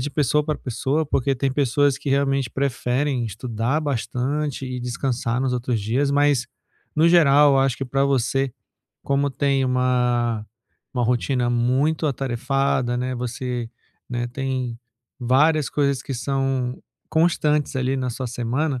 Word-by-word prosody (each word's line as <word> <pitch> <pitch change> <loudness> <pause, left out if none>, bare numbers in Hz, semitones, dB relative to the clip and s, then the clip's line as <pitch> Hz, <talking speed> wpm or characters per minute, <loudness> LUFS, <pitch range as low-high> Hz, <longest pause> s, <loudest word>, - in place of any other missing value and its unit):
de 135 - -2
pessoa 150 0 +1
pra 150 0 -1
pessoa, 135 +5 -1
porque 135 -1 0
tem 135 +1 -1
pessoas 140 0 +2
que, - - -6
realmente, 135 -2 +1
preferem 130 0 -1
estudar 115 +6 -2
bastante 140 +1 -2
e 125 0 -4
descansar 125 0 -2
nos 130 -1 0
outros 125 -2 -1
dias, 130 +7 0
mas, 145 -4 +3 0.5
no 160 +2 +4
geral, 145 -4 +6
acho 135 -2 +2
que 135 - -3
pra 135 +2 +1
você, 135 0 +1 0.5
como 140 0 +1
tem 135 0 +1
uma 125 -3 +1 0.5
uma 125 - 0
rotina 125 +1 +1
muito 130 +7 +1
atarefada, 130 -1 0
né, 130 +1 -2
você, 125 -1 -4 0.4
né, 120 0 -2
tem 130 -2 -3 0.4
várias 145 +5 +3
coisas 140 -3 0
que 135 - -5
são 135 0 -1 0.3
constantes 150 -3 +1
ali, 130 +1 0
na 130 -2 -2
sua 125 +1 -4
semana, 125 +4 -1
130 Hz, 140 wpm, -23 LUFS, 125-140 Hz, 0.5 s, geral